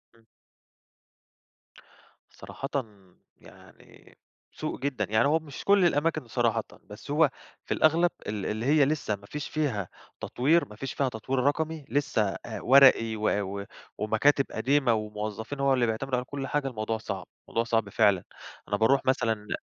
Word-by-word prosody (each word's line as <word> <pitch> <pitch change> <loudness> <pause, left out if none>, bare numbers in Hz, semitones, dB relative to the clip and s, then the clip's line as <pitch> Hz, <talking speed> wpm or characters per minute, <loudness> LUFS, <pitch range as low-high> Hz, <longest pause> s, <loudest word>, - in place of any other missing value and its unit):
امم. 115 -1 -26 2.1
صراحةً 135 - -8 0.7
يعني - - -18 0.3
سوء - - -5
جدًا، 130 -6 -1
يعني 110 +4 +3
هو 160 +3 +3
مش 145 -4 -10
كل 200 -2 +5
الأماكن 155 -3 +1
صراحةً، 115 -2 0 0.2
بس 105 +7 -10
هو 150 0 +4 0.4
في - - -1
الأغلب 165 +3 +3 0.2
ال 105 -2 -3
اللي 110 +2 -3
هي 145 0 +4
لسه 145 -8 -1
ما 100 0 -16
فيش 150 +7 -6
فيها 125 - -2 0.3
تطوير، 155 +7 +2
ما 105 - -11
فيش 135 +5 -5
فيها 135 -2 0
تطوير 125 +3 -3
رقمي، 155 +2 -1
لسه 140 -5 +1 0.2
آآ - - -6
ورقي 130 -4 +6
و 110 0 0 0.3
و - - -8 0.3
ومكاتب 135 +6 +2
قديمة 130 +2 +2
وموظفين، 110 +4 -4
هو 140 0 +3
اللي 125 -2 +2
بيعتمد 115 +4 -2
عليهم 125 0 0
كل 140 -1 -4
حاجة، 145 0 -1
الموضوع 110 -3 -3
صعب، 100 -4 -6 0.2
الموضوع 115 - 0
صعب 115 -3 0
فعلًا. 100 -3 +3 0.4
أنا 105 0 0
باروح 125 +6 +3
مثلًا 125 -4 +2
ل 105 -1 -5
125 Hz, 155 wpm, -27 LUFS, 110-145 Hz, 2.1 s, ورقي